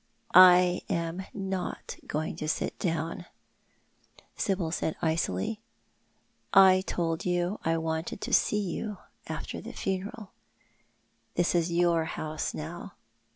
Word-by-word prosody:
" - - -23 0.2
I 180 0 +2
am 170 +3 -2
not 195 -2 -4
going 155 +1 -2
to 155 - -4
sit 155 - -2
down," 165 0 -2 1.1
Sibyl 185 -5 -1
said 160 -1 -1
icily. 160 - -1 0.5
" - - -42 0.2
I 185 0 +3
told 165 -2 -1
you 180 +3 0
I 165 0 +1
wanted 160 +2 -3
to - - -4
see 210 - +3
you 205 +2 -4 0.3
after - - -5
the - - -8
funeral. 195 +2 -4 1.0
This 175 - +2
is 170 -1 +1
your 170 -1 +2
house 155 -1 -4
now. 170 +4 -7
175 Hz, 125 wpm, -29 LUFS, 160-185 Hz, 1.1 s, I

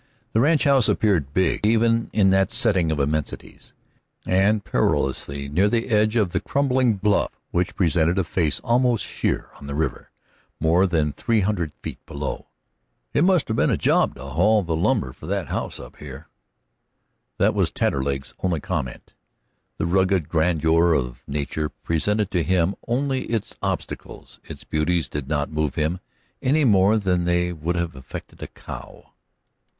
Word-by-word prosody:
The 110 - +3
ranchhouse 140 -3 +4
appeared 85 -11 +1
big 95 +6 +1
even 115 +1 +2
in 95 -3 +3
that 95 +1 +2
setting 95 -8 +2
of 75 - -1
immensities, 75 +1 -3 0.5
and 100 +2 +2
perilously 70 +1 -1
near 90 +9 +2
the 115 +2 0
edge 110 0 +2
of 105 -6 +2
the - - 0
crumbling 130 -4 +1
bluff 100 +1 +1 0.2
which 90 +1 -1
presented 85 -1 +2
a 95 - +2
face 80 -5 0
almost 120 -1 +2
sheer - - -2
on 70 - -10
the 70 - -4
river 80 -2 -2 0.5
more 85 +4 +3
than 80 -4 0
three 115 -3 +1
hundred 95 -6 -1
feet - - -7
below. 70 0 -5 0.7
"It 145 - +3
must 180 -4 +3
'a' - - +1
been - - +2
a - - +1
job - - +2
to 65 - -10
haul 95 +10 +2
the 85 -2 -2
lumber 85 - 0
for - - -12
that - - -2
house - - -3
up - - -11
here." 70 +1 -10 1.1
That - - +3
was - - +1
Taterleg's 70 0 -1
only 90 -4 0
comment. 65 -3 -5 0.6
The - - -1
rugged 95 -2 +2
grandeur 80 0 +3
of 60 -5 -2
nature 75 +1 -2
presented 105 +5 -1
to 90 -4 +1
him 90 +1 +1
only 130 +2 0
its 115 -3 -3
obstacles; - - -5
its - - -9
beauties 80 +2 0
did 75 -2 -5
not 75 0 -1
move 75 -2 -1
him 80 +3 -1 0.4
any 145 +3 +2
more 100 -1 +4
than 90 -4 0
they 90 0 +1
would 85 +2 -3
have 85 -4 -2
affected 65 0 -10
a - - -5
cow. - - -11
90 Hz, 160 wpm, -23 LUFS, 75-105 Hz, 1.1 s, ranchhouse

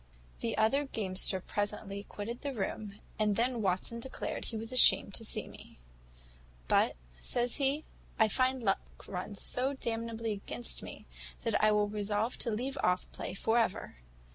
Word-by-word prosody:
"The 230 - -2
other 225 +7 +3
gamester 190 -6 0
presently 205 +1 -3
quitted 230 +4 -6
the 280 -2 -4
room, 205 0 -4 0.2
and 210 -1 +2
then 240 +1 +1
Watson 195 +4 0
declared 260 +3 -4
he 225 - -4
was 225 +2 -4
ashamed 250 -5 +8
to 225 - -4
see - - -2
me; - - -13 0.9
`but,' - - +3 0.3
says 245 0 0
he, 285 +2 0 0.3
`I 220 -2 +4
find 255 +1 +1
luck 195 -2 -1
runs 195 +1 -4
so 265 +3 +1
damnably 230 -2 -2
against 210 +4 0
me, - - -9 0.4
that - - +1
I 215 - +6
will 210 0 +3
resolve 210 +2 -1
to - - 0
leave 255 +6 -2
off 180 0 +2
play - - -5
for 225 +4 +2
ever. 220 - -1
220 Hz, 160 wpm, -32 LUFS, 205-245 Hz, 0.9 s, ashamed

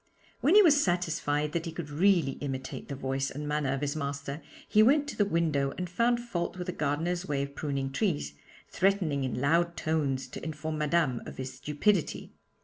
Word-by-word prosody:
When 320 +7 +4
he 420 - +9
was 290 -5 +5
satisfied 155 -4 0
that 170 +1 -2
he - - -4
could 160 -2 -6
really 170 -2 +3
imitate 135 -2 -5
the 140 - -5
voice 135 0 -2
and 150 +2 -6
manner 150 -2 0
of 135 0 -2
his 145 0 -1
master, 140 0 -4 0.3
he 215 - +5
went 285 +6 +4
to - - -6
the 205 - +2
window 155 -6 +1
and 180 - -3
found 235 +7 +2
fault 185 -7 -3
with 180 - -4
the 180 - -3
gardener's 175 +6 -1
way 140 -1 0
of 140 0 -6
pruning 140 -2 -2
trees, 145 - -1 0.3
threatening 180 -8 +1
in 130 -1 -2
loud 170 +5 +2
tones 145 -4 -1
to - - -8
inform 155 0 -4
Madame 150 -5 +1
of - - -9
his 130 0 -5
stupidity. 150 +7 0
155 Hz, 195 wpm, -29 LUFS, 140-180 Hz, 0.3 s, he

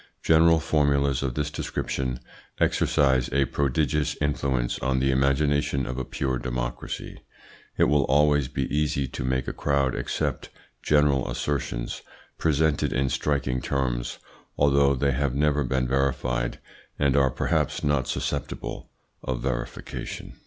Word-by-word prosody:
General 80 +1 +5
formulas 70 -3 +2
of 65 -3 -2
this 75 -1 -1
description 65 -3 -3 0.4
exercise 65 -3 +2
a 70 +1 +3
prodigious 70 +3 0
influence 70 -4 0
on 65 0 0
the 65 +1 +2
imagination 70 +1 +1
of 65 +1 -4
a - - -2
pure 65 0 -2
democracy. - - -5 0.6
It - - +4
will 75 -2 +3
always 75 0 +3
be 65 - -2
easy 70 -2 0
to 65 - -5
make 65 0 -1
a - - -2
crowd 70 -3 +1
accept - - -2 0.3
general 75 -3 +2
assertions, 60 -4 -3 0.4
presented 80 -2 +2
in 65 0 +1
striking 65 -2 -1
terms, 60 -3 -2 0.4
although 70 -1 +4
they 70 +2 +1
have 70 0 0
never 75 0 +2
been 65 0 0
verified, 65 -2 0 0.4
and 70 -3 +2
are 70 -2 +4
perhaps - - -1
not 75 -3 +1
susceptible - - -4 0.3
of 65 -2 -3
verification." - - -5
70 Hz, 130 wpm, -26 LUFS, 65-75 Hz, 0.6 s, General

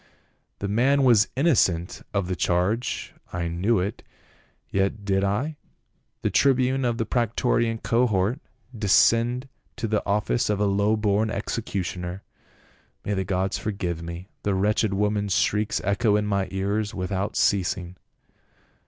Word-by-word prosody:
The 100 - -3
man 130 +7 +3
was 115 -5 +5
innocent 110 - +2
of 100 -2 0
the 90 - -1
charge 90 +8 -1
— - - -33
I 85 -1 -2
knew 95 +7 +1
it, 95 +4 -2 0.7
yet 100 +2 0
did 95 -1 +1
I, 125 +11 -1 0.7
the - - +1
tribune 130 -1 +3
of 120 -1 0
the 115 - -1
prae 120 +2 +1
torian 115 0 0
cohort, 115 0 +1 0.4
descend 115 +5 +3 0.3
to 120 -2 -3
the 105 -1 0
office 105 +4 0
of 105 -1 0
a 105 - +2
low 100 +2 +2
born 105 +1 +1
executioner. 95 -3 -4 0.8
May 105 - -1
the 95 -1 0
gods 95 +1 -1
forgive 90 -6 -3
me, 85 +2 -7
the 100 -1 0
wretched 105 +2 +1
woman's 105 -1 0
shrieks 105 0 +1
echo 105 +2 +2
in 105 0 +1
my 100 -2 0
ears 100 +3 -2
without 95 +2 -2
ceasing." 90 -2 0
105 Hz, 145 wpm, -25 LUFS, 95-115 Hz, 0.8 s, was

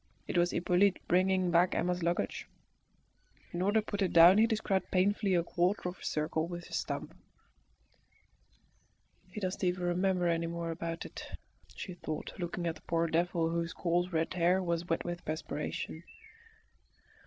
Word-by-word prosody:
It - - -4
was 175 0 +4
Hippolyte 180 +3 +2
bringing 185 0 +2
back 175 +1 +3
Emma's 180 0 0
luggage. 170 +1 -1 1.1
In 175 - -2
order 205 +4 +3
to - - -19
put 205 -2 -3
it 190 - +1
down 175 +4 +8
he 225 - +6
described 215 -4 0
painfully 195 +1 +2
a 170 - +2
quarter 180 +2 0
of 180 - -10
a - - -13
circle 155 +1 -1
with 175 0 -7
his - - -3
stump. - - -4 2.1
"He 210 - -6
doesn't 185 -1 -3
even 180 0 0
remember 180 0 +1
any 165 0 +1
more 170 0 -3
about 165 0 -4
it," - - -8 0.4
she 185 - -6
thought, 155 -3 -5
looking 175 0 -3
at 165 - 0
the 155 - -16
poor 165 0 0
devil, 165 0 +1
whose 170 0 -2
coarse 175 +1 0
red 165 0 0
hair 180 +1 +2
was 170 0 -1
wet - - 0
with 175 0 -4
perspiration. 155 +1 -4
175 Hz, 165 wpm, -32 LUFS, 170-185 Hz, 2.1 s, down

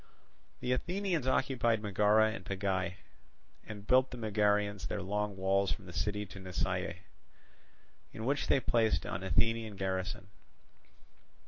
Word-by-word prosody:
The 125 - -1
Athenians 175 +1 0
occupied 120 -4 +2
Megara 105 +2 +4
and 105 -4 -6
Pegae, 95 -1 -1 0.7
and 105 -2 -9
built 130 +3 +4
the 125 - -7
Megarians 105 -2 +1
their - - -3
long 105 +1 -2
walls 95 +1 +2
from 100 - -4
the 90 - -10
city 105 +3 -1
to 100 - -10
Nisaea, 90 -1 -2 1.2
in 110 - -6
which 140 +3 0
they 140 - +4
placed 110 -9 +2
an 85 - -3
Athenian 110 +3 +1
garrison. 95 +1 -3
105 Hz, 130 wpm, -33 LUFS, 95-115 Hz, 1.2 s, Megara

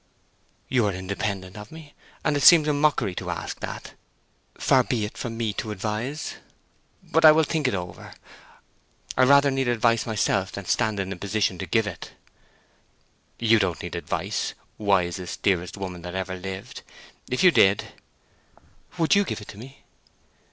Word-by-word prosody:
"You 120 -5 +2
are 100 - -1
independent 95 0 -4
of 105 +1 -10
me, 160 -2 -12 0.3
and 150 - +2
it 145 - 0
seems 155 +1 +8
a 150 - +2
mockery 145 -9 +1
to - - -5
ask - - -5
that. - - -7 0.6
Far 130 - +4
be 115 -4 -1
it 105 - -8
from 115 -2 -5
me 115 -3 -1
to 110 - -4
advise. 110 +8 -4 0.7
But 165 +1 +1
I 155 - +11
will 160 +1 +4
think 155 -2 0
it 125 - 0
over. 90 -1 -7 1.0
I 130 - +4
rather 140 +1 +5
need 135 -1 0
advice 115 -1 +2
myself 100 -3 0
than 100 - -6
stand 110 0 0
in 95 0 -2
a - - -8
position 100 -1 -1
to 95 - -4
give 110 +6 +2
it." 100 -4 -7 1.2
"You 115 -1 +4
don't 95 -5 -1
need - - -6
advice, - - -3 0.2
wisest, 90 -3 0
dearest 90 -1 0
woman 90 -2 -6
that 90 +1 -7
ever 95 0 -3
lived. 95 +1 -7 0.5
If 125 +8 0
you 180 - +8
did—" 100 -9 +3 1.1
"Would 165 -1 +3
you 200 0 +5
give - - -4
it 105 - -12
to 100 - -10
me?" 135 +4 -13
110 Hz, 170 wpm, -25 LUFS, 95-135 Hz, 1.2 s, I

